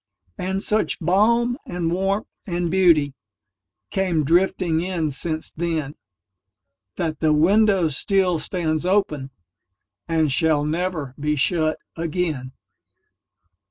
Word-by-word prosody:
And 190 +2 -2
such 215 +1 0
balm 235 - +2
and 175 -2 -3
warmth 195 +3 0 0.2
and 175 -2 -1
beautyCame 145 - -1
drifting 170 0 +2
in 170 -4 -1
since 155 +3 -3
then, 160 -4 -2 1.0
That 160 -3 -2
the 155 -1 +3
window 195 +3 +4
still 180 +4 +1
stands 155 -1 -1
openAnd 180 -8 0 1.0
shall 155 0 +2
never 160 -4 -2
be 150 +1 0
shut 155 +2 +1 0.2
again. 160 -6 -3
165 Hz, 95 wpm, -22 LUFS, 150-185 Hz, 1.0 s, window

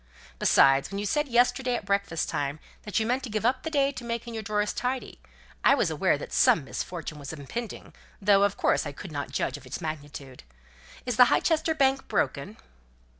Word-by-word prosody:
Besides, 135 0 +4
when 200 - -5
you 205 - -2
said 295 +9 0
yesterday 250 +1 +2
at 220 - -5
breakfast 200 -5 0
time 145 +1 -2 0.3
that 210 - 0
you 220 - 0
meant 250 +3 0
to 255 - -6
give 215 +1 -2
up 255 +2 +2
the 320 - -4
day 280 -3 +2
to 255 -3 -8
making 235 0 -4
your 220 - -4
drawers 210 0 -1
tidy, 250 +1 -3 0.4
I - - +6
was - - +1
aware - - +2
that - - -8
some - - +4
misfortune 150 -3 -6
was 140 -1 -7
impending, 180 - -7 0.3
though 200 0 +4
of 200 -1 +2
course - - +1
I 145 - -6
could 185 +4 -9
not 145 -1 -4
judge 135 - -2
of 140 - -15
its - - -5
magnitude. 145 -5 -7 0.6
Is 250 -3 -2
the 250 - +9
Highchester 320 +4 +1
Bank 270 -1 +2
broken?" 140 - -1
210 Hz, 200 wpm, -27 LUFS, 155-250 Hz, 0.6 s, the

